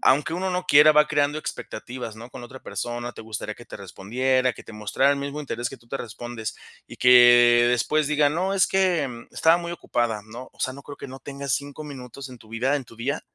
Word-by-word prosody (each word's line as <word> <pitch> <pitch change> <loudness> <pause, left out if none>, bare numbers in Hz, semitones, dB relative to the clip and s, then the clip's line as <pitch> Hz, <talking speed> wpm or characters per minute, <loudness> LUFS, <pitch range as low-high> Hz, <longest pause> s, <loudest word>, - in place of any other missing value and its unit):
aunque 145 +4 +3
uno 185 +2 -2
no 180 0 -2
quiera, 150 +2 +7
va 150 0 +5
creando 145 0 +1
expectativas, 120 -5 -7
¿no?, 115 +3 -11
con - - -9
la - - -8
otra 130 +2 -12
persona, 120 0 -4
te - - -11
gustaría 110 -1 -6
que 120 - -13
te - - -9
respondiera, 125 +7 0
que - - -12
te - - -12
mostrara 105 +6 +1
el 140 - +1
mismo 140 +1 -4
interés 120 -4 -3
que - - -10
tú 115 - -25
te 135 - -3
respondes, 120 -1 -6 0.3
y - - -11
que 120 -1 +7
después 145 +5 +1
diga: 150 0 +3
"No, 180 +6 -1
es 195 - +4
que, 180 -7 +2
mm, 120 -2 -11
estaba 165 +1 +5
muy 170 0 -5
ocupada", 120 -9 -2
¿no? 115 +4 -10
O - - -20
sea, 130 - 0
no 140 +2 -11
creo 145 - -9
que - - -9
no 130 +1 -9
tengas 140 -1 -5
5 145 +3 -3
minutos 135 -2 -9
en 125 -1 -12
tu 110 - -18
vida, 125 +6 0
en 140 - -5
tu 115 - -16
día. 125 +6 -2
130 Hz, 245 wpm, -24 LUFS, 120-145 Hz, 0.3 s, quiera